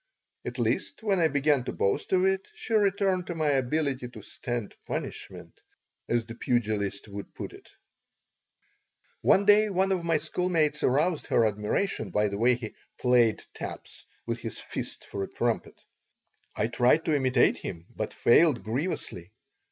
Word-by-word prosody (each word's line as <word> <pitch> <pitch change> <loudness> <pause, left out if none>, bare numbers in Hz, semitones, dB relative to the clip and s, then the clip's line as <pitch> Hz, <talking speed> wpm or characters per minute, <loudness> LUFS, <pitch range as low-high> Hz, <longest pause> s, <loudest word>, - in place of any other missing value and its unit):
At - - -5
least - - -1
when 200 -4 +2
I 165 - +5
began 145 -2 +2
to - - -2
boast 100 - -1
of 185 0 +4
it 190 0 +1
she 250 - -5
returned 195 -3 +2
to 175 - -4
my 155 -2 +1
ability 135 -1 0
"to - - -11
stand 120 -4 -4
punishment," - - -6 0.5
as 120 -1 +1
the 115 - -8
pugilists 110 -4 -1
would 100 -1 -8
put - - -6
it - - -15 1.5
One 200 - +4
day 210 +1 +6
one 190 0 +1
of 185 -3 0
my 165 -1 +2
schoolmates 155 -1 0
aroused 155 +6 +1
her 115 - +3
admiration 105 - -1
by 105 +3 +1
the 100 0 -4
way 120 +2 +4
he 115 -3 -7 0.2
"played" 120 -3 +3
taps - - -7 0.2
with - - -3
his - - -6
fist - - -6
for 100 - -5
a 95 - -2
trumpet. 120 -1 -2 0.8
I 105 - +1
tried 125 +7 +3
to 155 - +2
imitate 130 -3 +3
him, 85 -2 -7
but - - -3
failed 135 0 +4
grievously. 110 - -3
135 Hz, 160 wpm, -28 LUFS, 115-180 Hz, 1.5 s, day